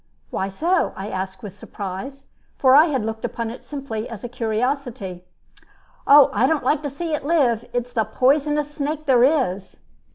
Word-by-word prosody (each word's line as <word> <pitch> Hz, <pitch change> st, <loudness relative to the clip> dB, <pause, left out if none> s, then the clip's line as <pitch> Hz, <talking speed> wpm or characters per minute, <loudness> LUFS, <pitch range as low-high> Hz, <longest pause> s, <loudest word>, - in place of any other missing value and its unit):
"Why 190 Hz, -, -2 dB
so?" 335 Hz, -, 0 dB
I 195 Hz, +2 st, -6 dB
asked, 190 Hz, +1 st, -5 dB
with 200 Hz, -2 st, -8 dB
surprise, 205 Hz, +8 st, -8 dB, 0.2 s
for 260 Hz, -1 st, +4 dB
I 300 Hz, +4 st, +8 dB
had 270 Hz, -9 st, -1 dB
looked 220 Hz, 0 st, -5 dB
upon 230 Hz, -1 st, -3 dB
it 240 Hz, -, -10 dB
simply 265 Hz, -6 st, -5 dB
as 225 Hz, -4 st, -9 dB
a -, -, -3 dB
curiosity. 230 Hz, -5 st, -3 dB, 0.8 s
"Oh, 285 Hz, 0 st, +8 dB
I 260 Hz, -, +3 dB
don't 315 Hz, -2 st, 0 dB
like 285 Hz, +3 st, +1 dB
to 290 Hz, -, -3 dB
see 320 Hz, +4 st, -4 dB
it 295 Hz, -, -2 dB
live. 265 Hz, -7 st, +1 dB
It's 245 Hz, 0 st, -3 dB
the 225 Hz, -3 st, +1 dB
poisonousest 295 Hz, +5 st, +1 dB
snake 300 Hz, +1 st, -3 dB
there 255 Hz, -4 st, +4 dB
is." 225 Hz, -, 0 dB
255 Hz, 175 wpm, -22 LUFS, 220-290 Hz, 0.8 s, I